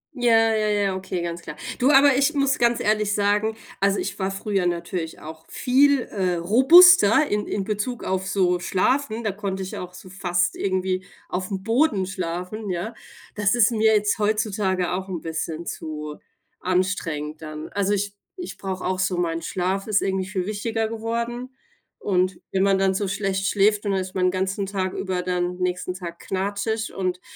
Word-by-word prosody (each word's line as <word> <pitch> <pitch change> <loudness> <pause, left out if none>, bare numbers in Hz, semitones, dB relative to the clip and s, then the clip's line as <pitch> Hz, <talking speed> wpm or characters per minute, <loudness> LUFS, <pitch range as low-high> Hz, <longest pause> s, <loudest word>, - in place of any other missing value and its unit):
Ja, 225 -3 +4
ja, 215 -1 +1
ja, 205 -2 +1
okay, 185 -2 -4
ganz 170 0 -4
klar. 150 - -8 0.2
Du, 260 +2 +4
aber 280 -1 +6
ich 280 +3 +2
muss 275 0 +2
ganz 235 0 +3
ehrlich 210 -1 +1
sagen, 210 +2 +1 0.2
also, 200 0 +2
ich - - -4
war 190 0 0
früher 195 -1 -1
natürlich 170 -1 -3
auch 160 +1 -10
viel, 275 +1 +3
äh, 185 -4 -1
robuster 265 - +7
in 210 -3 -1
in 200 - -2
Bezug 215 +4 -3
auf 190 0 -2
so 180 -2 +2
schlafen. 225 +6 0
Da 215 - 0
konnte 195 -1 -4
ich 190 - -6
auch 180 0 -7
so 185 +1 -12
fast 180 -2 0
irgendwie 185 -1 -1 0.3
aufm 190 +1 -3
Boden 225 -3 +2
schlafen, 185 +3 -4
ja. 185 +6 -3 0.4
Das 205 +1 +1
ist 240 0 +4
mir 220 -1 +3
jetzt 210 +1 +1
heutzutage 205 -4 0
auch 190 +1 -4
'n 175 -4 -4
bisschen 165 0 -4
zu 150 -2 -6 0.4
anstrengend 170 -5 -1
dann. 155 0 -7
Also, 200 0 0
ich 200 0 -1 0.2
ich 360 -2 -7
brauche 190 -1 -5
auch 185 0 -1
so 185 -1 0
mein 165 -1 -1
Schlaf 190 +4 -2
ist 210 -1 +2
irgendwie 190 -1 -1
viel 190 -2 -2
wichtiger 220 +2 -2
geworden. 235 +3 -4 0.4
Und 185 -2 0
wenn 190 0 +1
man 195 -1 +3
dann 190 0 +2
so 200 +1 -1
schlecht 195 0 -1
schläft, 210 +1 +2
und 200 - 0
dann 190 - +1
ist 185 0 -7
man 185 -1 +1
den 180 - +3
ganzen 190 +2 -1
Tag 190 -1 -2
über 185 -2 -2
dann 180 0 -1
nächsten 180 0 -2
Tag 175 -2 -8
knatschig 200 +3 -2
und 185 -1 -2
195 Hz, 180 wpm, -23 LUFS, 180-215 Hz, 0.4 s, robuster